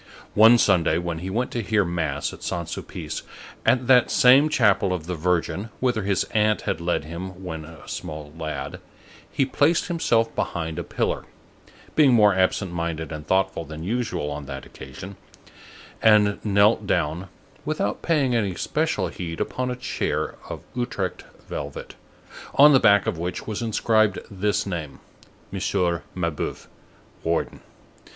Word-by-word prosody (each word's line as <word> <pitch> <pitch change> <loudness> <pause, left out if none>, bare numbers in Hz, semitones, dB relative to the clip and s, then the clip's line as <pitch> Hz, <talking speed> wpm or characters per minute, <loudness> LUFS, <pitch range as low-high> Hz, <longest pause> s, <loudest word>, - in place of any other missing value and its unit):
One 110 +3 +8
Sunday, 90 -7 +3
when 85 -2 -3
he 90 +3 -5
went 120 +6 -1
to 120 - -2
hear 105 -1 +1
mass 80 -5 -2
at - - -11
Saint 85 -2 -3
Sulpice, - - -6 0.5
at 125 -1 +3
that 125 -1 +5
same 140 +2 +6
chapel 105 -8 +3
of 85 -4 -4
the 90 - -3
Virgin 90 +5 -1
whither 125 -4 +1
his 100 -2 +1
aunt 105 0 +2
had 85 - -2
led 85 -3 0
him 90 +4 -7
when 80 -3 -5
a 80 0 -13
small 75 -3 -6
lad, 75 -4 -5 0.5
he 135 - +1
placed 150 +6 +2
himself 115 -9 +1
behind 80 0 -2
a - - -3
pillar, - - -2 0.7
being 145 -5 +6
more 105 -3 +6
absent 95 0 +1
minded 85 -2 -3
and 75 -1 -7
thoughtful 95 -2 +1
than 80 +1 -8
usual 110 -7 -2
on 75 -1 -6
that 70 -1 -7
occasion, 90 +9 -10 0.8
and 105 -2 +4
knelt 105 +1 +3
down, 85 +2 -1 0.3
without 105 - -2
paying 145 -7 +1
any 100 -6 0
special 150 - -1
heed, 85 -1 -6
upon 130 0 -2
a 125 - -2
chair 125 - -2 0.2
of - - -6
Utrecht 120 -7 -3 0.2
velvet, - - -6 0.6
on 145 +1 +8
the 135 - +7
back 100 -3 +5
of 80 - -2
which 90 +2 -4
was 110 +1 -4
inscribed 110 -2 +2
this 100 +1 0
name: 85 -7 -5 0.5
Monsieur 90 -3 0
Mabeuf, 85 -4 -3 0.6
warden. 85 0 -1
95 Hz, 150 wpm, -24 LUFS, 85-115 Hz, 0.8 s, One